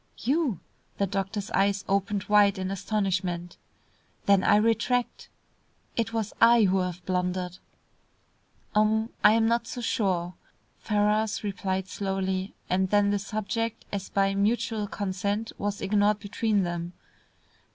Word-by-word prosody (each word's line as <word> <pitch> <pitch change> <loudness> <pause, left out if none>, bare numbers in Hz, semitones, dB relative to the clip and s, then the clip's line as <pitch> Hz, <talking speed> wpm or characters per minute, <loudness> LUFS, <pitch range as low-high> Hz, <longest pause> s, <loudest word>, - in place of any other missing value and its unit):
"You!" 270 - 0 0.4
the 200 - +2
doctor's 195 +1 -3
eyes 200 0 +1
opened 200 0 0
wide 205 -1 +4
in 190 0 -3
astonishment. 185 -3 -2 0.7
"Then 200 -1 +4
I 205 - +5
retract. 230 +3 +1 0.7
It 225 -1 -1
was 225 -2 -2
I 235 0 +7
who 190 -1 +3
have 180 -1 -4
blundered." 180 -1 -2 1.1
"Um 220 +1 +2
I 210 - +8
am 225 0 +3
not 235 +1 +1
so - - -6
sure," 185 -7 0 0.5
Ferrars 210 0 +1
replied 190 -2 -2
slowly, 190 0 -2
and 190 +1 +1
then 205 0 +3
the 205 - +1
subject 215 +2 -3
as 200 -2 -4
by 195 0 +1
mutual 215 +1 0
consent 200 +3 -2
was 205 0 -2
ignored 205 +1 +2
between 205 0 0
them. 175 0 -4
200 Hz, 130 wpm, -27 LUFS, 190-215 Hz, 1.1 s, I